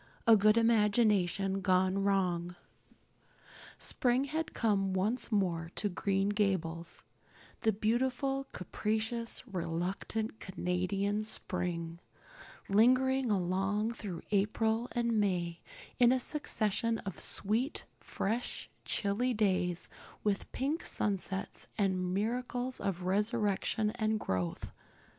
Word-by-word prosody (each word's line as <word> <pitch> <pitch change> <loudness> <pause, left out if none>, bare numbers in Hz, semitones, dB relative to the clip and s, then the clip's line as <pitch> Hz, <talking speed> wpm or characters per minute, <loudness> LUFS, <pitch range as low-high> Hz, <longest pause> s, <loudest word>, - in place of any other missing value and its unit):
A 230 - +8
Good 215 +1 +5
Imagination 210 -4 +3
Gone 185 0 +2
Wrong 180 -3 +1 1.2
SPRING 250 +1 +2
had 315 +3 -2
come 195 -4 +1
once 215 +7 0
more 175 -6 0
to 205 - 0
Green 195 +1 0
Gables 180 -5 -1 0.6
the 220 - +3
beautiful 255 +6 0
capricious, 220 +6 -2
reluctant 190 +4 -3
Canadian 195 +3 -1
spring, 175 -5 -2 0.7
lingering 255 +5 +4
along 195 +3 +1
through 200 -7 -6
April 220 +3 +1
and 235 -2 +1
May 175 -4 0 0.4
in 245 -1 +7
a 260 - +3
succession 230 -5 -1
of 195 - -5
sweet, 225 +8 0
fresh, 225 +5 -3
chilly 230 +5 0
days, 185 -4 +1 0.4
with 205 -2 -1
pink 285 +5 -1
sunsets 195 -1 -2
and 185 -3 +1
miracles 245 +5 -1
of 185 -2 -2
resurrection 210 +1 +1
and 220 -2 0
growth. 90 - -2
205 Hz, 100 wpm, -32 LUFS, 185-230 Hz, 1.2 s, A